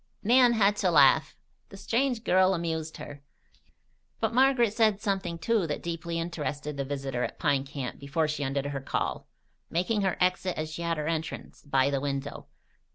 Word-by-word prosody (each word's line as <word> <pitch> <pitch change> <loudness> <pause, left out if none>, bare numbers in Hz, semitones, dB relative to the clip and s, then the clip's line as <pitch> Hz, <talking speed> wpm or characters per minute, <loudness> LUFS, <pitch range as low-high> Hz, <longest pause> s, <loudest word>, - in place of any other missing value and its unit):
Nan 245 +2 +5
had 210 -2 +3
to 190 - +2
laugh. 145 -5 +4 0.3
The 195 - -11
strange 235 +4 0
girl 185 -1 +4
amused 160 -2 -3
her. 145 -1 -9 1.0
But 220 0 0
Margaret 250 -4 +4
said 215 -3 +3
something, 195 -5 -2
too, 210 0 0
that 150 - -4
deeply 170 0 -4
interested 150 -3 -4
the 140 - -2
visitor 135 -2 -3
at - - -4
Pine 140 -4 +1
Camp 135 -2 -6
before 145 +3 -1
she 150 -1 -2
ended 135 0 -2
her 140 -1 -3
call, - - -3 0.4
making 205 +5 0
her 190 -2 0
exit 180 0 +1
as 155 0 -3
she 165 - -6
had 170 -1 -1
her 150 - -3
entrance, 160 -1 -4
by 135 -1 +1
the 140 -1 -1
window. 140 0 -4
165 Hz, 175 wpm, -28 LUFS, 145-200 Hz, 1.0 s, Nan